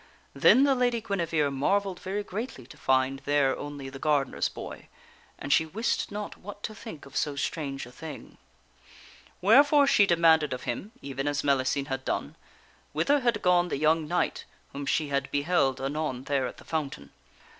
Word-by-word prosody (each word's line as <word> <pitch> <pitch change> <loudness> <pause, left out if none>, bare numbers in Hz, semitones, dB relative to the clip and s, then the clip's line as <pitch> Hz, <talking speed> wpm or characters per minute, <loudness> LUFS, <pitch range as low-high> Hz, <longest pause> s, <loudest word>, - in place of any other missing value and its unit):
Then 265 - +6
the 280 -1 +4
Lady 245 -2 +1
Guinevere 165 -9 0
marvelled 190 +7 0
very 200 +2 -3
greatly 205 - -6
to - - -14
find 130 +1 +1
there 145 -2 +2
only 145 -2 -7
the 135 0 -9
gardener's 145 -3 +1
boy, - - -9 0.5
and 140 +1 0
she 160 - +5
wist 210 +10 -2
not 210 0 -5
what 205 +1 -10
to 215 - -4
think 210 -8 -10
of 135 -1 -14
so 145 +1 0
strange 140 -2 -3
a 125 - -13
thing. 150 +2 -10 1.0
Wherefore 285 +8 +6
she 205 -7 +5
demanded 160 -4 +4
of 125 - -6
him, 210 - -4
even 135 0 -4
as 145 0 0
Mellicene 140 0 +1
had 130 0 -3
done, - - -3 0.6
whither 290 +1 +2
had 240 -5 0
gone 180 -1 +4
the 175 - -2
young 155 +1 +2
knight 175 +3 -1 0.3
whom 140 0 -5
she 155 -2 +1
had 140 -1 -1
beheld 145 -3 +1
anon 135 -1 -3
there 135 -2 0
at - - -9
the - - -15
fountain. 140 - -4
155 Hz, 175 wpm, -28 LUFS, 135-200 Hz, 1.0 s, Then